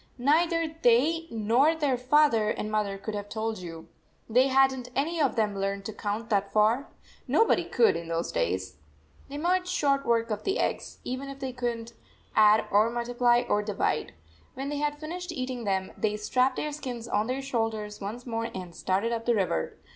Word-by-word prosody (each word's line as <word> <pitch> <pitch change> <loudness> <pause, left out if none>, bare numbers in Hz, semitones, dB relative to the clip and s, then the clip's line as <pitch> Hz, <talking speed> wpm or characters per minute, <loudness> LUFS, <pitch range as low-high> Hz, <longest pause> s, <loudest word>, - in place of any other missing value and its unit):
Neither 325 +4 +2
they 300 +8 +3
nor 235 +8 +3
their 290 -5 +1
father 250 -4 +3
and 215 0 -3
mother 210 -2 0
could 215 +2 -6
have 205 0 -5
told 220 0 -3
you. 165 -2 -9 0.4
They 250 +4 +4
had 270 0 +4
n 260 - -5
t 250 0 -12
any 315 +5 0
of 275 - +2
them 210 -3 +1
learned 195 0 -2
to 220 - -5
count 215 +3 -4
that 200 -1 +1
far. 220 +6 +3 0.4
Nobody 450 - +3
could 460 - +3
in 170 - -5
those 165 0 -2
days. 85 0 -2 0.5
They 285 - -6
made 360 +4 +1
short 280 -6 +1
work 230 -2 +1
of 210 - -3
the 390 - 0
eggs, - - -2
even 255 +2 -4
if 275 - -8
they 265 -2 -5
could 245 -1 -1
n 230 - -8
t 235 - -14 0.4
add 215 0 +6
or 210 +3 +4
multiply 240 0 +2
or 210 - +2
divide. 210 -1 -1 0.4
When 270 +2 -4
they 295 - -2
had 295 0 -1
finished 355 +3 -5
eating 255 -5 -4
them, 190 -1 -1
they 210 -1 -1
strapped 255 +5 +1
their 300 - -2
skins 250 -6 -6
on 215 -1 0
their 260 +2 -2
shoulders 220 -5 -2
once 220 +5 -6
more 230 -1 -2
and 180 -2 -7
started 195 +5 0
up 230 0 -3
the 240 - +4
river. 180 - -1
235 Hz, 200 wpm, -28 LUFS, 210-275 Hz, 0.5 s, add